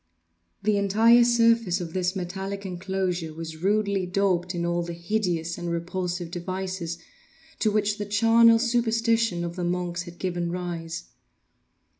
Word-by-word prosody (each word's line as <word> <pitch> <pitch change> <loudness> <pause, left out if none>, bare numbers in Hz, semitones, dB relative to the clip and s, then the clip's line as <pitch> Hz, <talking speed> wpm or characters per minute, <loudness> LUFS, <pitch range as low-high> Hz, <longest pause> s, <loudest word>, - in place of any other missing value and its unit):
The 210 0 +2
entire 220 +4 +5
surface 230 -5 +3
of 170 -2 -6
this 185 0 0
metallic 195 +2 -4
enclosure 180 -3 -3
was 160 -1 -7
rudely 200 +1 +1
daubed 180 -1 0
in 170 0 -1
all 175 0 0
the 170 0 -5
hideous 170 -2 -2
and 175 0 -4
repulsive 175 0 -3
devices 185 -1 -4 0.6
to 220 - +2
which 210 0 0
the 205 - -3
charnel 230 +2 +5
superstition 230 -5 +1
of 170 0 -4
the 180 - -3
monks 175 0 -2
has 175 -1 -10
given 175 -1 -2
rise. 170 -2 -4
185 Hz, 140 wpm, -26 LUFS, 175-210 Hz, 0.6 s, entire